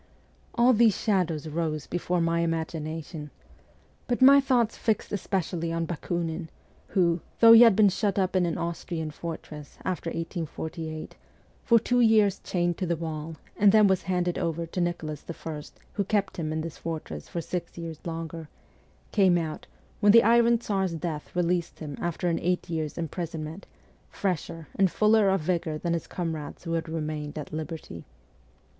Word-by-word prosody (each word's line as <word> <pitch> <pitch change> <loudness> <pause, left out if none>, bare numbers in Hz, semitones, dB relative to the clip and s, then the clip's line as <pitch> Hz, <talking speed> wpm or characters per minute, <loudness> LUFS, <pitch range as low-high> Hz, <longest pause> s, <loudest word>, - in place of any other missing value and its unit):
All 240 +2 +5
these 225 -2 +4
shadows 170 -7 0
rose 155 -1 -2
before 175 0 -1
my 165 0 +1
imagination. 160 -1 -3 0.8
But 245 - 0
my 275 +2 +8
thoughts 245 -4 +2
fixed 220 -2 -1
especially 175 -4 -2
on 165 0 -1
Bakunin, 165 0 -3 0.4
who, 170 -3 +2 0.2
though 230 0 +9
he 230 - +10
had 230 -4 +8
been 210 -1 +6
shut 200 +2 -1
up 190 -1 +1
in 180 -2 +3
an 165 - -2
Austrian 170 -1 -3
fortress, 150 -2 -8
after 180 -2 -2
1848, 160 -1 -5 0.5
for 235 - +5
two 245 +2 +1
years 215 -4 +4
chained 175 -2 -1
to 185 - -1
the 170 - +1
wall, 160 -1 -5 0.2
and 205 -1 +5
then 215 0 +6
was 190 -2 +3
handed 180 -1 -1
over 165 0 -1
to 175 +2 -3
Nicholas 160 -4 -3
I. 160 -2 -5 0.3
who 200 - 0
kept 200 0 -1
him 155 -3 -2
in 155 0 -1
this 165 -1 -7
fortress 155 - -6
for 170 - -3
six 175 +2 -5
years 165 -2 -6
longer, 165 -1 -6 0.6
came 190 -4 +4
out, 160 -2 -4 0.3
when 205 -1 +6
the 230 - +8
Iron 235 +1 +5
Tsar's 195 -6 -1
death 160 -2 -5
released 175 -1 0
him 150 -3 -6
after 175 +1 -2
an 165 -1 +1
eight 180 0 -1
years' 155 -3 -3
imprison 165 -1 -4
ment, 160 +6 -8 0.4
fresher 165 -4 -3
and 195 -1 +4
fuller 215 +1 +4
of 190 -2 +2
vigour 165 -1 -1
than 170 +2 -1
his 170 - -3
comrades 160 -4 -5
who 165 -1 -3
had 165 -1 -2
remained 155 -2 -4
at 150 0 -7
liberty. 155 - -6
170 Hz, 165 wpm, -27 LUFS, 160-195 Hz, 0.8 s, he